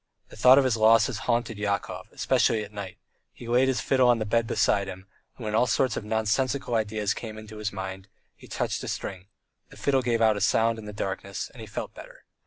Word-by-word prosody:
The -, -, -13 dB
thought 125 Hz, +4 st, +7 dB
of 140 Hz, -, +6 dB
his 125 Hz, -3 st, +1 dB
losses 110 Hz, +1 st, +4 dB
haunted 115 Hz, -2 st, 0 dB
Yakov, 100 Hz, -1 st, -2 dB
especially 110 Hz, -2 st, +1 dB
at 105 Hz, 0 st, -11 dB
night; 100 Hz, -3 st, -7 dB, 0.3 s
he 120 Hz, -, -12 dB
laid 125 Hz, +2 st, +3 dB
his 130 Hz, -1 st, 0 dB
fiddle 130 Hz, -2 st, +3 dB
on 120 Hz, -, +5 dB
the 110 Hz, -, -2 dB
bed 115 Hz, +2 st, +1 dB
beside 100 Hz, -2 st, +1 dB
him, 95 Hz, 0 st, -8 dB, 0.3 s
and 120 Hz, -, -8 dB
when 105 Hz, -, -3 dB
all 120 Hz, +3 st, +3 dB
sorts 130 Hz, 0 st, +1 dB
of -, -, -4 dB
nonsensical 110 Hz, +5 st, 0 dB
ideas 110 Hz, -2 st, 0 dB
came 110 Hz, -2 st, -7 dB
into 110 Hz, 0 st, -10 dB
his 105 Hz, 0 st, -3 dB
mind 95 Hz, 0 st, -6 dB, 0.3 s
he -, -, -15 dB
touched -, -, -2 dB
a -, -, -5 dB
string; 95 Hz, 0 st, -5 dB, 0.4 s
the -, -, -15 dB
fiddle 135 Hz, -2 st, +1 dB
gave 120 Hz, -2 st, 0 dB
out 110 Hz, -2 st, +4 dB
a -, -, -4 dB
sound 115 Hz, +2 st, +2 dB
in 110 Hz, -, -9 dB
the 105 Hz, -, -6 dB
darkness, 100 Hz, -2 st, -4 dB
and -, -, -12 dB
he -, -, -8 dB
felt -, -, -6 dB
better. -, -, -13 dB
110 Hz, 225 wpm, -26 LUFS, 105-120 Hz, 0.4 s, thought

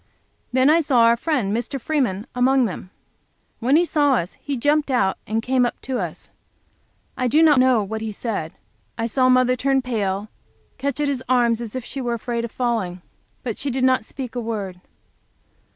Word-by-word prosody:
Then 260 Hz, +1 st, +3 dB
I 315 Hz, +3 st, +5 dB
saw 275 Hz, -7 st, +3 dB
our 230 Hz, 0 st, +5 dB
friend, 235 Hz, -6 st, -1 dB
Mr. 240 Hz, +4 st, -3 dB
Freeman, 235 Hz, -8 st, -1 dB
among 255 Hz, +1 st, +3 dB
them. 185 Hz, -3 st, -6 dB, 0.7 s
When 255 Hz, +4 st, +2 dB
he 345 Hz, +3 st, +5 dB
saw 290 Hz, -4 st, +2 dB
us 175 Hz, -5 st, -2 dB
he 280 Hz, -2 st, -3 dB
jumped 295 Hz, +4 st, +1 dB
out 200 Hz, -8 st, +2 dB
and 225 Hz, +1 st, -1 dB
came 255 Hz, 0 st, +2 dB
up 240 Hz, -, -1 dB
to 255 Hz, -2 st, -3 dB
us. 175 Hz, -5 st, -6 dB, 0.8 s
I 255 Hz, -, 0 dB
do 305 Hz, +7 st, +4 dB
not 300 Hz, -4 st, +6 dB
know 255 Hz, -4 st, +4 dB
what 220 Hz, +2 st, -5 dB
he 220 Hz, -1 st, -3 dB
said. 200 Hz, -7 st, -4 dB, 0.4 s
I 225 Hz, -, -1 dB
saw 255 Hz, +3 st, +2 dB
mother 255 Hz, 0 st, +4 dB
turn 270 Hz, +1 st, +1 dB
pale 210 Hz, -6 st, -1 dB
and 205 Hz, +2 st, -9 dB, 0.5 s
catch 280 Hz, +1 st, -2 dB
at 295 Hz, -, +1 dB
his 270 Hz, -3 st, -2 dB
arm 245 Hz, -2 st, +4 dB
as 230 Hz, 0 st, -3 dB
if 255 Hz, -2 st, -4 dB
she 275 Hz, -, -5 dB
were 240 Hz, -1 st, -1 dB
afraid 235 Hz, 0 st, -3 dB
of 235 Hz, -, -5 dB
falling. 215 Hz, -8 st, -2 dB, 0.4 s
But 230 Hz, -4 st, -4 dB
she 285 Hz, -, -2 dB
did 260 Hz, 0 st, -1 dB
not 255 Hz, -3 st, +3 dB
speak 255 Hz, +1 st, -7 dB
a 245 Hz, -, -3 dB
word. 200 Hz, -6 st, -5 dB
245 Hz, 200 wpm, -22 LUFS, 220-265 Hz, 0.8 s, not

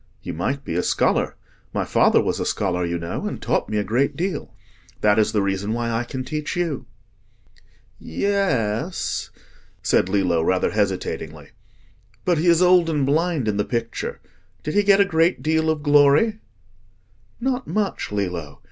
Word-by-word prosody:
You -, -, -5 dB
might 135 Hz, -, -2 dB
be -, -, -3 dB
a 90 Hz, -, +1 dB
scholar. -, -, +1 dB, 0.4 s
My -, -, 0 dB
father -, -, +4 dB
was -, -, -1 dB
a -, -, -1 dB
scholar, 90 Hz, -3 st, -1 dB
you 85 Hz, 0 st, -1 dB
know, 85 Hz, 0 st, -4 dB
and -, -, -5 dB
taught -, -, -1 dB
me 105 Hz, -, -1 dB
a 105 Hz, -, +1 dB
great 120 Hz, +8 st, 0 dB
deal. 175 Hz, -2 st, -3 dB, 0.5 s
That 105 Hz, 0 st, +4 dB
is 110 Hz, -, +2 dB
the 105 Hz, -2 st, +1 dB
reason 100 Hz, +2 st, -1 dB
why 120 Hz, 0 st, -2 dB
I 115 Hz, +1 st, -1 dB
can 130 Hz, +1 st, -5 dB
teach 150 Hz, +5 st, -4 dB
you." 155 Hz, -8 st, -2 dB, 1.1 s
"Yes," 150 Hz, -, -1 dB, 0.5 s
said 90 Hz, -, +2 dB
Lillo, 90 Hz, -4 st, +2 dB
rather 90 Hz, +3 st, +1 dB
hesitatingly. 100 Hz, -3 st, -2 dB, 0.8 s
"But 175 Hz, -3 st, +2 dB
he 170 Hz, -, 0 dB
is 170 Hz, +1 st, +5 dB
old 180 Hz, -2 st, +5 dB
and 150 Hz, -4 st, +1 dB
blind 155 Hz, -2 st, +1 dB
in 105 Hz, -1 st, 0 dB
the 105 Hz, -, +2 dB
picture. 115 Hz, 0 st, -3 dB, 0.4 s
Did 150 Hz, -, -3 dB
he 205 Hz, -, +4 dB
get 200 Hz, -1 st, +4 dB
a 200 Hz, -, +6 dB
great 165 Hz, -5 st, +1 dB
deal 160 Hz, +1 st, +1 dB
of 155 Hz, -2 st, -1 dB
glory?" 145 Hz, +9 st, +4 dB, 1.0 s
"Not 255 Hz, +1 st, -1 dB
much, 205 Hz, -, -2 dB
Lillo. 90 Hz, -8 st, -3 dB
135 Hz, 165 wpm, -22 LUFS, 100-170 Hz, 1.1 s, a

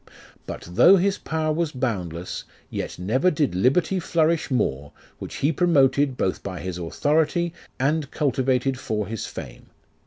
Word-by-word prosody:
But -, -, -6 dB
though 175 Hz, -, +7 dB
his 195 Hz, +1 st, +1 dB
power 155 Hz, -1 st, -1 dB
was 165 Hz, -1 st, -1 dB
boundless, 95 Hz, -, -3 dB, 0.3 s
Yet -, -, -4 dB
never 120 Hz, -, +2 dB
did 150 Hz, -, 0 dB
liberty 140 Hz, -, +2 dB
flourish 165 Hz, -1 st, +1 dB
more, 75 Hz, -, -1 dB, 0.3 s
which -, -, -7 dB
he 145 Hz, -, +1 dB
promoted, 140 Hz, -5 st, +3 dB
Both 95 Hz, -, -1 dB
by 95 Hz, -3 st, -6 dB
his 90 Hz, -1 st, -5 dB
authority, 155 Hz, -, +1 dB, 0.3 s
and 145 Hz, +2 st, +1 dB
cultivated 130 Hz, -2 st, 0 dB
for 105 Hz, -4 st, -2 dB
his 110 Hz, 0 st, -5 dB
fame. -, -, -9 dB
135 Hz, 145 wpm, -24 LUFS, 105-160 Hz, 0.3 s, though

